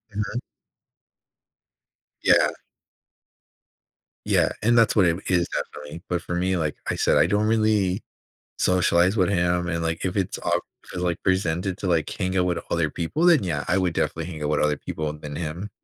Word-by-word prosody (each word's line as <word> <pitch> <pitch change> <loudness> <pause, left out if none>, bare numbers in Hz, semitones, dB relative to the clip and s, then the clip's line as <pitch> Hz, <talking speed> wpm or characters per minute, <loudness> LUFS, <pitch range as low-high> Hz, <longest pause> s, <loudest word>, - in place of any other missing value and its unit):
Mhm. 105 +3 -2 1.8
Yeah. - - +5 1.8
Yeah. - - +3
And 120 +2 +3
that's 115 -1 +4
what 100 -4 +5
it - - +4
m 85 +3 -5
is 90 -2 +2
definitely. 75 +3 -6
But 90 -2 -1
for 85 - -4
me, 90 +1 0
like 75 -3 -1
I - - 0
said, - - +2
I - - +4
don't 105 +1 +1
really 110 -3 +2 0.6
socialize 90 +1 +3
with 95 -4 +3
him. 90 -2 +1
And, 85 -1 -2
like, 80 0 -2
if 95 0 -2
it's 95 -3 -1
off - - 0 0.2
if - - -12
it's, 90 - -3
like, 90 -1 -1
presented 95 0 0
to, 100 - -4
like, 85 -4 +1
hang 95 -2 -2
out 90 - +2
with 90 -1 0
other 85 -3 +1
people, 90 - -1
then, 170 -6 +6
yeah, 75 -5 -2
I 90 - +2
would 90 -3 +1
definitely 80 +1 -1
hang 80 -4 -7
out 75 - -1
with 75 - +1
other 75 -1 +1
people 75 -1 -4
than 75 -1 -8
him. 85 +6 -5
90 Hz, 190 wpm, -24 LUFS, 80-95 Hz, 1.8 s, then